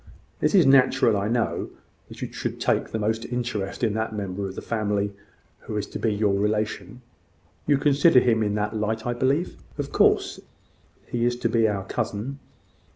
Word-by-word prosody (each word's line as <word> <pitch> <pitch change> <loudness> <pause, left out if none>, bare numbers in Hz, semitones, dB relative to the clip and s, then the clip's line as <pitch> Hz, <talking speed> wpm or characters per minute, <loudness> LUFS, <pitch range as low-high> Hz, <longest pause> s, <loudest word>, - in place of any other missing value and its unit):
"It - - +2
is 180 - +6
natural, 130 -4 +5
I 100 0 -1
know, 115 +1 -1 0.4
that - - -8
you - - -6
should - - -4
take - - +1
the - - -3
most 110 +1 -1
interest 120 -4 -3
in 110 -3 +2
that 110 0 -2
member 100 -1 -3
of 95 - -8
the - - -5
family 105 -3 -1 0.5
who 105 - -5
is 105 - -1
to - - -6
be 110 - +1
your 105 -1 +1
relation. 105 +4 -2 0.6
You 145 - +4
consider 145 +1 +5
him 115 -3 +2
in 105 -1 0
that 105 +1 -2
light, 110 +1 -2
I 120 - 0
believe?" 135 +7 0 0.2
"Of - - -4
course. - - +2 0.7
He 120 -1 -2
is 120 0 +2
to 120 - -1
be 115 -1 +3
our 100 -2 -2
cousin." 115 +8 -3
110 Hz, 185 wpm, -25 LUFS, 105-125 Hz, 0.7 s, is